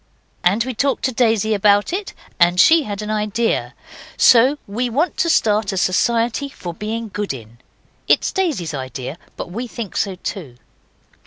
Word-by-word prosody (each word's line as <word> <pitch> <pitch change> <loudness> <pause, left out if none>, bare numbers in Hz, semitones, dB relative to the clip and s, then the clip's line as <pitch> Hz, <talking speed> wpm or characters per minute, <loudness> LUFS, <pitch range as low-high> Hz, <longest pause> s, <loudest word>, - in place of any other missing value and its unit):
And 200 +6 +3
we 260 +1 -4
talked 275 +4 0
to 260 - +1
Daisy 225 -3 +2
about 205 - +3
it, 390 +1 -4 0.3
and 175 +1 +4
she 325 - +7
had 205 0 -5
an 210 - -4
idea. 215 +2 -1 0.4
So 255 +5 +5
we 240 +5 -2
want 300 +8 0
to 335 - +1
start 210 -8 +2
a 190 - -4
society 230 +8 +1
for 175 -10 -7
being 220 +4 -4
good 205 -9 -3
in. 115 -1 -13 0.5
It - - +4
is - - -2
Daisy's 300 - -1
idea, 130 +2 -6 0.2
but - - -6
we 235 +6 -4
think 230 -4 -7
so 195 -2 -1
too. 175 - -7
215 Hz, 170 wpm, -19 LUFS, 185-245 Hz, 0.5 s, she